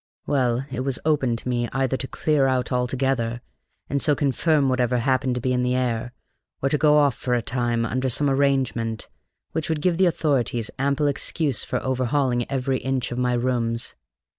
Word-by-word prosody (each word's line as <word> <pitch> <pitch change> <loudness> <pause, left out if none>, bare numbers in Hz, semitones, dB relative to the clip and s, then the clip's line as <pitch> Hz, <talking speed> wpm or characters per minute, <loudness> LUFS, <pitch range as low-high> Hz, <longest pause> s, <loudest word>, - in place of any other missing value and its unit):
Well, 125 -2 +1
it 130 - -3
was 130 0 -1
open 135 -6 +2
to 115 - -7
me 120 -1 0
either 135 0 +1
to 130 - -4
clear 145 -2 +1
out 130 -1 0
altogether, 125 -1 0 0.5
and 140 0 -1
so 150 - +3
confirm 145 +1 +2
whatever 125 -1 +1
happened 130 0 +1
to 125 - -2
be 130 +1 0
in 125 - +1
the 125 0 +1
air, 120 -2 -1 0.5
or 135 - 0
to 150 - +1
go 150 -1 +5
off 145 -3 +4
for 125 0 -1
a 120 - +1
time, 120 -2 0
under 130 +2 -1
some 145 +4 0
arrangement 135 -5 0 0.4
which 160 0 -3
would 160 -2 0
give 175 +2 +1
the 190 - +5
authorities 130 -8 0
ample 140 +2 +1
excuse 145 -1 0
for - - -2
overhauling 130 -1 0
every 135 -1 0
inch 130 -2 -2
of 120 - -3
my 125 0 +1
rooms. 120 -1 -1
130 Hz, 190 wpm, -24 LUFS, 120-140 Hz, 0.5 s, go